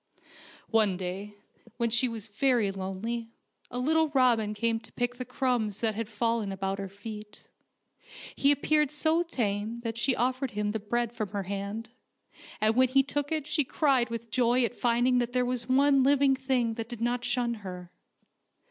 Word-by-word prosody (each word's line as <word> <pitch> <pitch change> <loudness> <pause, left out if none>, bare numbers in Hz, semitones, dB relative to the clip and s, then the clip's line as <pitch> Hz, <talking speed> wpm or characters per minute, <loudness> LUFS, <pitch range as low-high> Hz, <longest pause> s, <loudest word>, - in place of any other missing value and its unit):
One 215 -5 +3
day, 190 +3 -5 0.4
when 235 -1 0
she 240 +3 +4
was 225 -2 -6
very 225 -1 +2
lonely, 195 +5 -4 0.4
a 245 - -5
little 315 +5 +2
robin 230 -5 +3
came 225 +1 0
to - - -16
pick 245 0 -2
the 255 - -5
crumbs 245 -5 -1
that 225 -2 +1
had 220 0 -4
fallen 230 -1 0
about 195 +1 -3
her 195 -1 -4
feet. 210 +1 -10 0.9
He 280 - +4
appeared 300 0 +2
so 315 +3 +2
tame 225 -7 -2
that 230 -1 -4
she 260 +1 +2
offered 255 +2 0
him 210 0 0
the 220 - -2
bread 235 +3 -1
from 215 -4 -3
her 200 0 -3
hand, 200 +4 -5 0.7
and 215 +1 +2
when 260 +1 +5
he 270 +2 +4
took 290 +1 -2
it 310 -3 -1
she 300 0 +1
cried 265 -3 +2
with 230 -1 -6
joy 245 0 +3
at 240 - -4
finding 245 +1 +2
that 240 0 -2
there 250 -1 +2
was 245 0 -3
one 275 +1 +4
living 275 0 +4
thing 260 -3 0
that 225 0 -6
did 240 -3 -7
not 240 +1 0
shun 240 -2 0
her. 180 -2 -8
235 Hz, 180 wpm, -28 LUFS, 210-255 Hz, 0.9 s, when